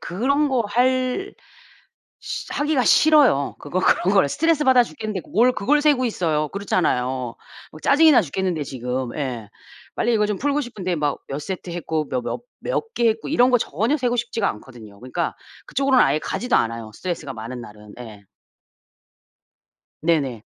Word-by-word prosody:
그런 280 - 0
거 260 -3 +1
할 255 - 0 0.9
시 - - -5
하기가 290 -3 +1
싫어요. 285 - +4
그거 145 +6 -3
그런 185 +1 +2
거를 195 -8 +4
스트레스받아 295 - +3
죽겠는데 215 -4 -5
뭘 240 +6 +4
그걸 295 +9 +1
세고 290 -4 +3
있어요. 160 -10 0
그렇잖아요. 130 - -1 0.4
막 155 - -13
짜증이 315 +3 +5
나 270 - +6
죽겠는데 175 -1 -2
지금. 125 -1 -4
예. 125 -7 -4 0.5
빨리 240 - +1
이거 210 - +2
좀 210 -1 -2
풀고 285 +4 0
싶은데 200 -9 -3
막 150 -2 -1
몇 140 - -3
세트 185 +1 -6
했고 160 -3 -3
몇 125 - -1
몇 - - -4 0.2
몇 465 -2 -3
개 235 - +2
했고 225 0 -1
이런 255 -4 +4
거 245 - +5
전혀 225 - 0
세고 245 -4 -1
싶지가 230 -3 -1
않거든요. 110 -3 -11
그러니까 125 +1 -3 0.3
그쪽으로는 270 -2 +3
아예 140 +3 +2
가지도 240 +10 0
않아요, 115 -1 -2
스트레스가 175 - -5
많은 115 +2 -7
날은 105 -2 -13
예. 110 -4 -10 1.8
네네. 140 -9 0
190 Hz, 340 characters per minute, -22 LUFS, -, 1.8 s, 나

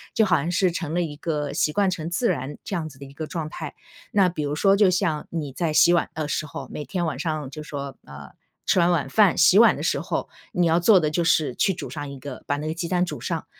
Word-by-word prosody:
就 220 - +4
好 185 - +3
像 150 +4 -2
是 180 0 +2
成 170 -2 -4
了 175 - +2
一 150 -3 -5
个 150 -2 -3
习 155 -1 +1
惯 195 +3 +2
成 165 -3 -4
自 230 +7 0
然 150 -5 -3
这 205 - -4
样 160 -3 -3
子 135 - -16
的 140 - -10
一 135 - -13
个 155 +2 -6
状 160 -2 -4
态。 155 - -7 0.3
那 200 -5 +3
比 170 -3 -3
如 145 0 -2
说 195 +5 +4
就 200 -1 +5
像 165 -4 0
你 155 -4 -4
在 165 +2 -1
洗 170 +3 +5
碗 175 - +1
的 155 -2 -2
时 155 - -2
候， - - -7
每 150 - -5
天 175 +2 -2
晚 145 -5 -3
上 155 -3 -3
就 155 - -7
说 140 -2 -6
呃， 70 0 -11 0.3
吃 - - +3
完 170 0 +4
晚 170 -6 +1
饭 195 +4 +4
洗 195 - +6
碗 230 - +7
的 - - -5
时 - - +1
候， - - -3 0.2
你 180 -5 +1
要 165 +1 +3
做 190 +2 +6
的 155 -3 0
就 170 +2 0
是 155 -5 +2
去 190 +8 +1
煮 - - -7
上 145 -2 -5
一 140 - -8
个 135 0 -9
把 145 - 0
那 150 - -5
个 155 - -1
鸡 170 +1 -4
蛋 180 +1 +1
煮 - - -6
上， 165 -3 -3
160 Hz, 300 characters per minute, -24 LUFS, 150-180 Hz, 0.3 s, 碗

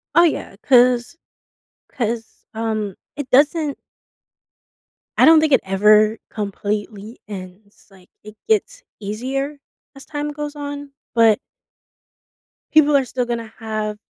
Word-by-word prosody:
Oh, 340 - +7
yeah, 310 - 0
'cause 250 +1 +4 0.8
'cause, 230 -1 -4
um, 215 -3 -2 0.2
it 290 -3 -6
doesn't 295 +2 +3 1.4
I - - +6
don't 320 0 +8
think 310 -2 +2
it - - +5
ever 210 +3 +4
completely 210 +1 -4
ends, 200 +1 -11
like, 185 -2 -20
it 215 0 -12
gets - - 0 0.2
easier 265 +8 -3 0.4
as 275 - -13
time 295 -1 -4
goes 295 0 -6
on, 285 -1 -6 0.2
but 225 -3 +5 1.3
people 300 -2 +5
are 270 -2 +3
still 250 0 -2
gonna 230 -2 -4
have 215 -1 -3
235 Hz, 120 wpm, -20 LUFS, 215-290 Hz, 1.4 s, don't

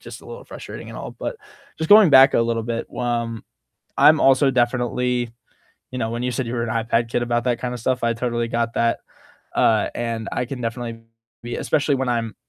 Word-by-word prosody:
just - - -10
a - - -14
little 485 +1 -9
frustrating - - -9
and - - -8
all. - - -7
But - - -5 0.4
just 160 - -3
going 210 -5 +8
back 135 +1 +7
a - - +4
little 115 -1 -1
bit, 115 0 -4
um, 115 -2 -3 0.5
I'm 155 +1 +6
also 135 +1 +4
definitely 125 -1 0 0.6
you 125 - -4
know, 115 - -1
when 120 +1 -4
you 125 - -1
said 120 0 -3
you 115 - -4
were 120 - -1
an 115 0 -1
iPad 115 0 0
kid 120 - -1
about 120 0 0
that 120 -1 0
kind 125 -1 -3
of 120 - -7
stuff, 125 +1 -1
I 115 - +2
totally 120 0 -2
got 115 0 -1
that, 115 0 +1 0.5
uh, 110 -2 +2
and 115 -2 -3
I 125 - -1
can 125 0 -7
definitely 115 0 -4 0.4
be, 120 0 -5
especially 145 -1 +1
when 130 -1 -2
I'm 115 -2 -2
120 Hz, 215 wpm, -22 LUFS, 115-125 Hz, 0.6 s, going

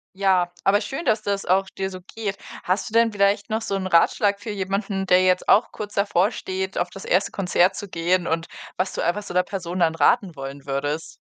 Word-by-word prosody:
Ja, 190 -2 +2
aber 200 +1 +4
schön, 270 +9 -5
dass 220 -4 +2
das 200 -1 -2
auch 190 +1 +2
dir 190 0 -4
so 185 - -7 0.2
geht. 200 -3 -3 0.3
Hast 185 +3 -1
du - - -15
denn 230 0 +4
vielleicht 200 0 +1
noch 220 +1 -1
so 200 - -2
'n 190 -1 -2
Ratschlag 200 +3 +3
für 210 +2 -8
jemanden, 195 0 -2
der 185 0 +4
jetzt 185 -1 +2
auch 215 - +5
kurz 205 -1 -7
davor 200 0 +2
steht, 190 -3 -4
auf 175 - 0
das 195 +2 -10
1. 185 +2 +1
Konzert 185 0 +2
zu 205 - -6
gehen 175 +1 0
und 165 +1 -1 0.3
was 185 +1 -1
du - - -3
einfach 190 +5 0
zu - - -8
der 180 0 +3
Person 185 -1 -5
dann 165 -2 +2
raten 190 0 +2
wollen 135 +1 -8
würdest? 145 +3 -3
190 Hz, 225 wpm, -23 LUFS, 180-205 Hz, 0.3 s, auch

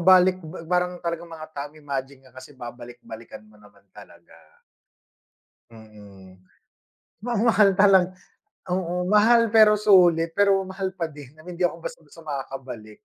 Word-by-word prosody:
balik 185 +1 +5 0.3
parang 180 0 0
talagang 170 0 -4
mga 155 -1 -10
taong 145 +2 -8
imagine 135 -2 -6
ka 130 - -20
kasi 135 +1 -15
babalik-balikan 120 -3 -11
mo 105 0 -22
naman 105 -1 -21
talaga. - - -17 1.4
Mm, 105 -4 -15 0.9
ma 245 - -3
mahal 210 -4 +4
talag 190 -2 +4 0.6
oo, 180 0 -2
mahal 230 +3 +4
pero 210 -1 +5
sulit 175 -5 +4
pero 200 -1 +3
mahal 190 0 -5
pa 170 -3 -4
din 145 -3 -13
na 155 - -20
hindi 180 +2 -5
ako 175 - -1
basta - - -8
basta 165 - -16
makakabalik. 135 -7 -8
170 Hz, 140 wpm, -23 LUFS, 130-190 Hz, 1.4 s, balik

